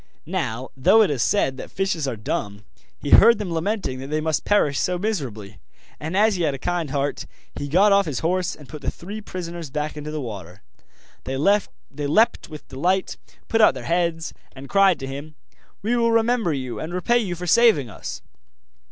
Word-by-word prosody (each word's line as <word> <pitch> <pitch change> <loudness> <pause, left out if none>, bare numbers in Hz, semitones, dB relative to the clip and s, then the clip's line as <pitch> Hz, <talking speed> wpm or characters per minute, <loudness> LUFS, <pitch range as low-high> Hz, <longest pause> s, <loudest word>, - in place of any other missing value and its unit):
Now, 130 -8 -3
though 190 +12 +5
it 195 - +1
is 135 -5 -1
said 130 +3 +1
that - - -8
fishes 185 -6 -1
are 130 - -2
dumb, 105 -1 -4 0.4
he - - -4
heard 230 +1 +8
them 200 -5 -4
lamenting 165 -5 -2
that 135 - -7
they 155 +2 -1
must 155 -2 -1
perish 150 -9 +2
so 180 0 0
miserably, 125 - -4 0.4
and, 160 +5 -3
as 215 0 +4
he - - -2
had 145 -4 +1
a - - -5
kind 175 +1 -2
heart, 140 +1 -2 0.3
he 145 - -5
got 190 +8 +4
off 200 -2 +4
his 140 -5 -3
horse 180 +1 0
and 145 - -14
put 150 +1 -9
the - - -1
three 205 +5 -8
prisoners 170 -5 -6
back 150 +2 -3
into 150 0 -6
the 155 0 -4
water. 100 - -8 0.6
They 135 0 -3
leapt 195 - +1
with 155 -2 -10
delight, 180 +8 0 0.3
put 225 - +2
out 215 - +6
their 130 - -7
heads, 165 +2 -1 0.2
and 135 +1 -9
cried 195 -2 +4
to - - -3
him: 140 +3 -7 0.5
'We 230 +4 +1
will 230 -1 +3
remember 230 -4 +2
you 130 -4 -4
and 170 +3 -5
repay 240 +7 +2
you 190 -6 -2
for 180 +1 -6
saving 215 - +4
us! 105 - -7
160 Hz, 195 wpm, -23 LUFS, 135-195 Hz, 0.6 s, heard